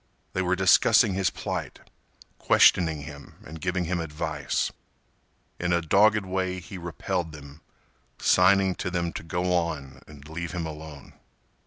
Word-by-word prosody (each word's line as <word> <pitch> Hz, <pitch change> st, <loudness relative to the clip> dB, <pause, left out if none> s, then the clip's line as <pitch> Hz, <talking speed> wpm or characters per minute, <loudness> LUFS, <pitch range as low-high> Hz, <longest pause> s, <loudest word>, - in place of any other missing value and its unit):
They 95 Hz, -, 0 dB
were 90 Hz, 0 st, +1 dB
discussing 95 Hz, +1 st, +5 dB
his 95 Hz, -2 st, +1 dB
plight, -, -, -5 dB, 0.6 s
questioning 80 Hz, -4 st, +4 dB
him 70 Hz, -1 st, -11 dB
and 80 Hz, +1 st, -10 dB
giving 90 Hz, 0 st, -1 dB
him 85 Hz, +1 st, -1 dB
advice. 80 Hz, -2 st, -2 dB, 0.9 s
In 85 Hz, 0 st, -1 dB
a 85 Hz, -, +3 dB
dogged 100 Hz, +5 st, +3 dB
way 95 Hz, 0 st, -2 dB
he 90 Hz, +2 st, -9 dB
repelled 85 Hz, -1 st, -3 dB
them, 70 Hz, +1 st, -12 dB, 0.6 s
signing 95 Hz, +1 st, +4 dB
to 95 Hz, -, -2 dB
them 85 Hz, -1 st, -2 dB
to -, -, -5 dB
go 90 Hz, +3 st, -2 dB
on 70 Hz, -6 st, -2 dB
and 75 Hz, -1 st, -13 dB
leave 85 Hz, +2 st, -5 dB
him 85 Hz, -2 st, -3 dB
alone. 75 Hz, -3 st, -9 dB
85 Hz, 145 wpm, -26 LUFS, 80-95 Hz, 0.9 s, discussing